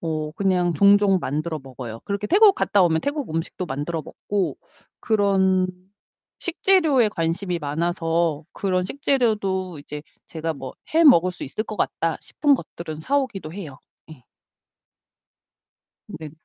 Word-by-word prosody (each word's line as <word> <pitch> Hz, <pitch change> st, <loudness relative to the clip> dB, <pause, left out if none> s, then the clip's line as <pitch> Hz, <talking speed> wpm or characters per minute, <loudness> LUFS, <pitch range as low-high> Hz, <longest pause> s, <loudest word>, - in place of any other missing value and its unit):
어 155 Hz, -2 st, -3 dB
그냥 180 Hz, -2 st, +1 dB
종종 200 Hz, +1 st, +5 dB
만들어 155 Hz, +3 st, -3 dB
먹어요. 125 Hz, -4 st, -8 dB
그렇게 200 Hz, +1 st, -2 dB
태국 400 Hz, +2 st, +6 dB
갔다 200 Hz, -, +2 dB
오면 160 Hz, -2 st, +2 dB
태국 285 Hz, -3 st, -2 dB
음식도 165 Hz, +2 st, -3 dB
만들어 150 Hz, +3 st, -3 dB
먹고 200 Hz, +5 st, -3 dB, 0.4 s
그런 195 Hz, -4 st, +2 dB, 0.7 s
식재료에 325 Hz, -, +3 dB
관심이 170 Hz, +1 st, -2 dB
많아서 165 Hz, +1 st, -1 dB
그런 185 Hz, -2 st, 0 dB
식재료도 205 Hz, -, 0 dB
이제 150 Hz, 0 st, -8 dB, 0.3 s
제가 160 Hz, 0 st, -3 dB
뭐 135 Hz, -2 st, -8 dB, 0.2 s
'해 330 Hz, +1 st, +5 dB
먹을 185 Hz, -, +6 dB
수 180 Hz, -, -7 dB
있을 215 Hz, +10 st, -3 dB
것 215 Hz, -, -7 dB
같다.' 165 Hz, -1 st, -1 dB
싶은 285 Hz, -1 st, +2 dB
것들은 165 Hz, -10 st, -7 dB
사 280 Hz, -, +1 dB
오기도 195 Hz, -, -4 dB
해요. 160 Hz, -8 st, -8 dB, 0.3 s
예. 130 Hz, -6 st, -14 dB, 1.8 s
네. 160 Hz, -6 st, -8 dB
180 Hz, 275 characters per minute, -23 LUFS, 160-210 Hz, 1.8 s, 태국